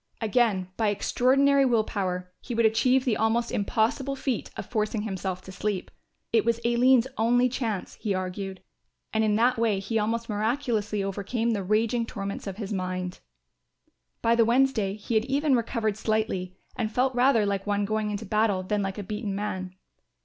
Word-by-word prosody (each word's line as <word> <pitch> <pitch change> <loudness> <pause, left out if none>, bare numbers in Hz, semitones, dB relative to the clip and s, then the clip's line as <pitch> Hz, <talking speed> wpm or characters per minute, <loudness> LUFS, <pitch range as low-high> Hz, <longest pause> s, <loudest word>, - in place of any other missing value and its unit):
Again, 215 -4 +1
by 220 - +1
extraordinary 275 +7 +3
will 235 -4 +3
power, 180 -4 -3
he 245 - -5
would 230 0 +3
achieve 250 +4 +3
the 240 -4 +2
almost 230 +2 +1
impossible 235 +6 0
feat 260 -4 -2
of - - -4
forcing 215 -2 -1
himself 190 -3 -4
to 190 - -10
sleep. 195 0 -3 0.4
It 225 - +4
was 235 0 +1
Aline's 240 +1 +4
only 245 +2 +4
chance, 230 -6 -3
he 205 -3 0
argued; 185 +1 -4 0.5
and 220 0 +2
in 210 -1 +2
that 240 +2 +3
way 220 -4 +2
he 220 +3 -1
almost 230 +2 -1
miraculously 215 -2 -1
overcame 205 +4 -1
the 210 -3 -1
raging 225 +4 +1
torments 200 -1 -5
of 195 -1 -5
his 210 -2 -4
mind. 185 -1 -3 1.0
By 230 - +4
the 235 0 +5
Wednesday 235 -4 +2
he 215 +2 -5
had 220 0 +3
even 280 +1 +2
recovered 225 -3 -1
slightly 215 -5 -1 0.2
and 220 -3 -2
felt 255 +3 +1
rather 245 -3 +4
like 200 0 -2
one 205 0 +1
going 215 +1 -1
into 210 +1 -4
battle 210 -2 +1
than 205 +2 -1
like 195 0 -3
a 205 - -4
beaten 210 0 -4
man. 185 -3 -4
220 Hz, 175 wpm, -27 LUFS, 200-235 Hz, 1.0 s, the